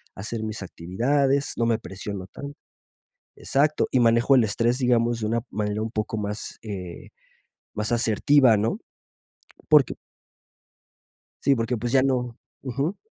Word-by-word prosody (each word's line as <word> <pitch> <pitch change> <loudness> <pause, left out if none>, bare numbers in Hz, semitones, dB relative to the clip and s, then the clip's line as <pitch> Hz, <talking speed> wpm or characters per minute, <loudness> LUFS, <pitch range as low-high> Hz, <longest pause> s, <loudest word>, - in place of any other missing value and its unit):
hacer 110 +3 -5
mis 110 -2 -5
actividades, 135 +11 0
no 115 - +1
me 115 -1 +2
presiono 95 -1 -7
tanto. 140 +7 -9 0.8
Exacto, 150 +2 +1
y 130 - +2
manejo 120 +3 +4
el 125 -4 +5
estrés, 115 +4 +1
digamos, 120 -2 +2
de 110 - -2
una 115 +2 0
manera 105 0 -2
un 115 - -3
poco 110 0 -3
más, 105 0 -5
eh, 95 -5 -7 0.7
más, 105 +2 -1
asertiva, 120 +2 +4
¿no? 115 - -1 0.9
Porque 150 -5 +5 1.5
sí, 140 - +4
porque, 115 0 -1
pues, 120 +2 -3
ya 135 -1 +5
no 125 -3 -1 0.3
Ujú. 140 - -2
115 Hz, 135 wpm, -24 LUFS, 105-135 Hz, 1.5 s, el